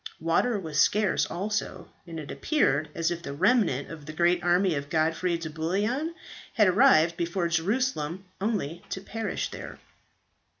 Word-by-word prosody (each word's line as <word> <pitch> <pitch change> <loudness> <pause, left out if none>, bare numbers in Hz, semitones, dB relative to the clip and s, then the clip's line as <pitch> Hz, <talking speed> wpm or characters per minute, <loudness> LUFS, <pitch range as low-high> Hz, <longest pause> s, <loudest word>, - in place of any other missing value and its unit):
Water 185 +8 +1
was 155 -5 -3
scarce 210 +3 +2
also; 195 -1 -3 0.2
and 165 -1 -6
it 150 - -7
appeared 155 - +1
as 165 0 0
if 170 0 -4
the 140 - -6
remnant 185 - +2
of 155 -3 -10
the 155 - -6
great 175 +2 +2
army 175 +1 +3
of 140 -1 -4
Godfrey 165 +2 +1
de 165 -1 -6
Bouillon 205 - -1 0.4
had 210 -3 +5
arrived 180 -5 +5
before 170 +1 -1
Jerusalem 180 - -1 0.2
only 185 -6 -2
to - - -3
perish 225 +3 -4
there. - - -8
175 Hz, 155 wpm, -27 LUFS, 160-210 Hz, 0.4 s, had